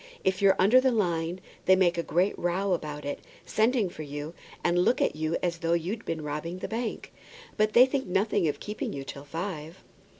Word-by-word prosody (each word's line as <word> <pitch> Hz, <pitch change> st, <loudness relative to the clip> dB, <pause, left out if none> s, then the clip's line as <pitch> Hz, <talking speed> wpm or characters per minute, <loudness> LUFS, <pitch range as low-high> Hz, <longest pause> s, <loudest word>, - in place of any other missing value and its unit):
"If 190 Hz, 0 st, +1 dB
you're 195 Hz, -1 st, +6 dB
under 220 Hz, +8 st, +6 dB
the 260 Hz, -, +3 dB
line, 175 Hz, -5 st, 0 dB, 0.2 s
they 190 Hz, -, +7 dB
make 180 Hz, -2 st, +3 dB
a 170 Hz, -, 0 dB
great 180 Hz, +4 st, +1 dB
row 185 Hz, +3 st, 0 dB
about 150 Hz, -3 st, -4 dB
it, 145 Hz, -, -3 dB, 0.3 s
send 220 Hz, -4 st, +1 dB
for -, -, -8 dB
you, 145 Hz, +2 st, -6 dB, 0.3 s
and 175 Hz, 0 st, +2 dB
look 210 Hz, +7 st, +3 dB
at -, -, +1 dB
you 155 Hz, +1 st, -1 dB
as 170 Hz, -2 st, -1 dB
though 165 Hz, 0 st, +1 dB
you'd 185 Hz, +7 st, -2 dB
been 160 Hz, -1 st, -3 dB
robbing 150 Hz, +4 st, -4 dB
the -, -, -5 dB
bank; 230 Hz, 0 st, -4 dB, 0.4 s
but 215 Hz, 0 st, +2 dB
they 245 Hz, +2 st, +8 dB
think 265 Hz, -2 st, -2 dB
nothing 195 Hz, -1 st, +1 dB
of 150 Hz, -, -2 dB
keeping 210 Hz, +1 st, -4 dB
you 140 Hz, -, -5 dB
till 140 Hz, +1 st, -8 dB
five." 165 Hz, +1 st, -6 dB
175 Hz, 205 wpm, -28 LUFS, 160-205 Hz, 0.4 s, they